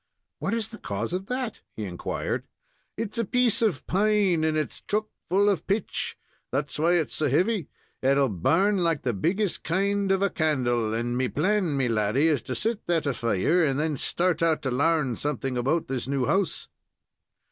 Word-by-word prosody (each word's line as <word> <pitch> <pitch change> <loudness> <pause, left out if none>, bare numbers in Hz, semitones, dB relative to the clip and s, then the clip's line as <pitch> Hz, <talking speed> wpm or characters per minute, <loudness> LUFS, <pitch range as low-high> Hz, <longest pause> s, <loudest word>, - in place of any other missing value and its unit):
"What's 220 +2 -1
the 225 - -10
cause 105 - -3
of 190 +2 -3
that?" 250 -2 -2 0.2
he 110 - -4
inquired. 90 -3 -3 0.5
"It's 225 +1 -3
a - - +2
piece 245 +2 +2
of 210 -10 +1
pine, 200 -4 +2
and 155 0 +1
its 155 - -3
chuck 215 +1 -1 0.2
full 195 +3 +3
of 195 -6 +1
pitch. 200 +1 -1 0.3
That's 145 +3 -2
why 170 +3 +3
it's 170 -4 +1
so 150 -2 +1
heavy. 185 - +1 0.3
It'll 135 +1 +3
burn 165 - +2
like 165 -5 +1
the 125 - 0
biggest 180 - -1
kind 195 +3 +1
of 195 0 +2
a 200 - +2
candle, 120 -9 +1
and 120 +2 -1
me 130 +1 +1
plan, 175 +1 +1
me 130 -2 +1
laddy, 115 +7 +2
is 150 -5 +1
to 130 - -1
set 225 -1 -2
that 170 -3 +1
afire, 120 - +1
and 140 -2 +1
then 155 -1 0
start 175 +3 0
out 165 -2 +2
to 130 - -1
larn 145 -2 +1
something 135 -3 -2
about 135 +7 0
this 130 -2 -2
new 135 -2 0
house." 195 +1 0
160 Hz, 180 wpm, -26 LUFS, 130-195 Hz, 0.5 s, full